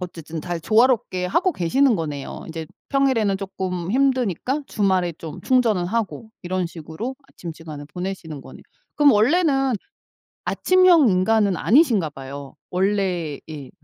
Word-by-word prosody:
어쨌든 165 -3 -7
잘 175 -2 -4
조화롭게 220 -4 +2
하고 340 - +2
계시는 240 +7 +2
거네요. 150 -4 -5
인제 160 -1 -6 0.2
평일에는 245 -8 +2
쪼끔 185 -2 -4
힘드니까 260 - +1
주말에 185 -4 +1
좀 160 0 -9
충전은 230 -9 +2
하고 220 +1 -3
이런 180 0 -1
식으로 170 - -7
아침 170 -9 -8
시간을 155 -3 -9
보내시는 180 -4 -6
거네요. - - -13 0.3
그럼 290 -3 +6
원래는 270 - +3 0.7
아침형 365 -7 +4
인간은 195 +1 +2
아니신가 225 - +3
봐요 135 0 -9
원래 185 -5 0
예. 145 -4 -8
190 Hz, 320 characters per minute, -22 LUFS, 165-250 Hz, 0.7 s, 그럼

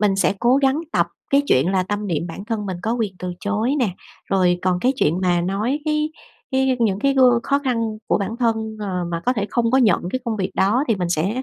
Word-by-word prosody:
Mình 200 -2 +2
sẽ 195 +1 +2
cố 245 +3 +4
gắng 275 +2 +2
tập - - +2 0.2
cái 280 +1 +4
chuyện 135 +8 +3
là 185 -1 +2
tâm 205 +2 -3
niệm 170 -2 -1
bản 180 +4 -8
thân 215 -3 -3
mình 185 - -3
có 225 - 0
quyền 215 -5 -2
từ 180 -1 -4
chối 215 +6 0
nè, 245 - +2 0.4
rồi 180 -2 +3
còn 180 -1 +1
cái 255 +2 +2
chuyện 170 - +1
mà 175 -2 +2
nói 205 +10 -1
cái 305 0 0 0.4
cái 265 -1 +2
những 200 -4 +2
cái 275 +4 +1
gương 250 -3 +5
khó 280 0 +1
khăn 230 -5 -2
của - - +2
bản 200 +4 -3
thân, 225 -2 -1
ờ, 185 -3 -2
mà 165 0 -2
có 250 - +4
thể 205 -4 -2
không 230 -1 +1
có 265 - +4
nhận 215 -8 +4
cái 255 - -1
công 225 -2 -2
việc 190 -1 -2
đó 220 +9 +2
thì 225 - +3
mình 180 -2 -2
sẽ 190 +10 -1
215 Hz, 250 wpm, -21 LUFS, 190-250 Hz, 0.4 s, gương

